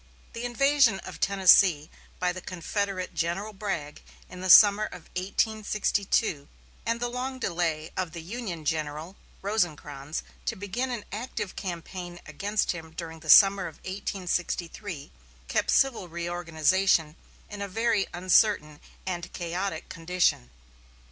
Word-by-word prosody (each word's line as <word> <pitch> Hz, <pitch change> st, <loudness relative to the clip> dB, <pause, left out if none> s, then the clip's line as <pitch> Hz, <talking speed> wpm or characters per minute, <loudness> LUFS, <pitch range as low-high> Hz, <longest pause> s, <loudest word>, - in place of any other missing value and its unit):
The 230 Hz, +1 st, -5 dB
invasion 270 Hz, -3 st, +3 dB
of -, -, -9 dB
Tennessee 185 Hz, -5 st, +5 dB, 0.3 s
by 180 Hz, 0 st, 0 dB
the 185 Hz, -, -7 dB
Confederate 185 Hz, +1 st, -3 dB
General 190 Hz, +6 st, -2 dB
Bragg 190 Hz, -8 st, -4 dB, 0.3 s
in 180 Hz, 0 st, -9 dB
the 185 Hz, -, -3 dB
summer 205 Hz, +2 st, +9 dB
of 180 Hz, -5 st, -9 dB
1862, 200 Hz, -4 st, 0 dB, 0.4 s
and 230 Hz, 0 st, 0 dB
the 245 Hz, -, -1 dB
long 255 Hz, +2 st, -4 dB
delay 165 Hz, -8 st, -2 dB
of 185 Hz, -3 st, -2 dB
the 165 Hz, 0 st, -7 dB
Union 185 Hz, -5 st, -6 dB
General 155 Hz, +3 st, -3 dB, 0.3 s
Rosecrans 155 Hz, -8 st, -2 dB, 0.2 s
to -, -, 0 dB
begin 210 Hz, +7 st, -3 dB
an 235 Hz, -4 st, -4 dB
active 210 Hz, -2 st, -5 dB
campaign 175 Hz, -1 st, -6 dB
against 200 Hz, +7 st, -1 dB
him 160 Hz, -2 st, -8 dB
during 165 Hz, -1 st, -7 dB
the 155 Hz, 0 st, -11 dB
summer 195 Hz, 0 st, +7 dB
of 160 Hz, -, -10 dB
1863, 180 Hz, -3 st, -4 dB, 0.4 s
kept -, -, 0 dB
civil 265 Hz, -9 st, +2 dB
reorganization 170 Hz, 0 st, +1 dB, 0.3 s
in 205 Hz, -1 st, -8 dB
a 200 Hz, -, -2 dB
very 225 Hz, +1 st, +1 dB
uncertain 180 Hz, -4 st, +3 dB, 0.3 s
and 175 Hz, -1 st, -4 dB
chaotic 175 Hz, 0 st, -3 dB
condition. 165 Hz, -, 0 dB
185 Hz, 130 wpm, -27 LUFS, 165-205 Hz, 0.4 s, summer